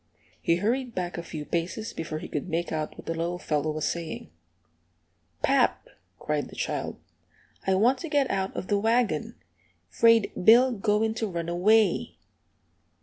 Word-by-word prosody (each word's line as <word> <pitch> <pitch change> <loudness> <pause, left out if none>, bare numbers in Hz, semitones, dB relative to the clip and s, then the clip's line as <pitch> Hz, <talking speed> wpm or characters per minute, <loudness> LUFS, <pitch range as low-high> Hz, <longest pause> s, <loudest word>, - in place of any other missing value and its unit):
He 170 - +3
hurried 235 +6 -1
back 175 -1 -3
a - - -3
few 155 -3 -7
paces 175 +8 -3
before 160 -1 -4
he - - -7
could 150 +5 -4
make 170 +1 -2
out 155 -1 -3
what - - -11
the 165 - -2
little 170 +2 -2
fellow 150 -3 -1
was 155 0 -1
saying. 170 -2 -5 1.1
"Pap," - - +2 0.3
cried 150 -1 -2
the - - -12
child, - - -3 0.7
"I 190 - +4
want 245 +7 +3
to 330 - -6
get 285 -3 +2
out 190 -1 -2
of - - -4
the 205 +1 +1
wagon. 230 +2 +1 0.5
'Fraid 230 -2 +4
Bill 245 +6 +7
goin' 220 0 +1
to 225 0 -2
run 170 -3 -4
away!" 200 +3 +3
190 Hz, 160 wpm, -27 LUFS, 165-225 Hz, 1.1 s, Bill